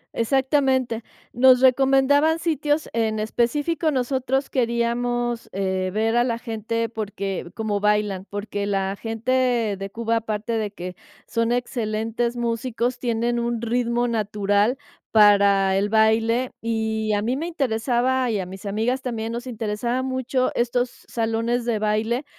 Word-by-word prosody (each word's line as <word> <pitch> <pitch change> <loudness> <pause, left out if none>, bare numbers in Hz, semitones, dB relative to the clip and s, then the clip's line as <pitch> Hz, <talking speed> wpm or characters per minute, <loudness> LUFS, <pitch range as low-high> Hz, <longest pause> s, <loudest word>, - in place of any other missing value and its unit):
Exactamente. 260 -1 +1 0.3
Nos 255 +1 +6
recomendaban 270 +4 +4
sitios, 305 -2 0
en 220 -1 0
específico, 290 +9 0
nosotros 265 0 -1
queríamos, 240 -1 -1
eh, 190 -1 -1
ver 220 +3 0
a 240 - +4
la 235 -2 -1
gente 230 0 -3
porque, 200 -5 -4
cómo 215 -2 -1
bailan, 210 -2 +1
porque 205 0 -4
la 195 -1 -1
gente 235 0 0
de 195 +1 -6
Cuba, 230 +1 0
aparte 220 0 -3
de 210 - -2
que 180 -2 -7 0.3
son 230 0 0
excelentes 235 0 -1
músicos, 240 +1 -1
tienen 235 0 0
un 235 -1 -1
ritmo 240 +1 0
natural 210 +1 +1 0.3
para 200 -2 +5
el 205 +1 +1
baile, 225 +3 +3
y 220 -1 -1
a 205 - +1
mí 245 +5 -1
me 325 - -3
interesaba 255 -3 0
y 205 - 0
a 185 - -4
mis 190 +2 -10
amigas 225 +6 -1
también 230 -2 -3
nos 240 +2 -5
interesaba 235 +1 -2
mucho 260 0 0
estos 245 +1 -1
salones 230 +1 -1
de 230 -3 0
baile, 215 +5 0
230 Hz, 135 wpm, -23 LUFS, 215-250 Hz, 0.3 s, Nos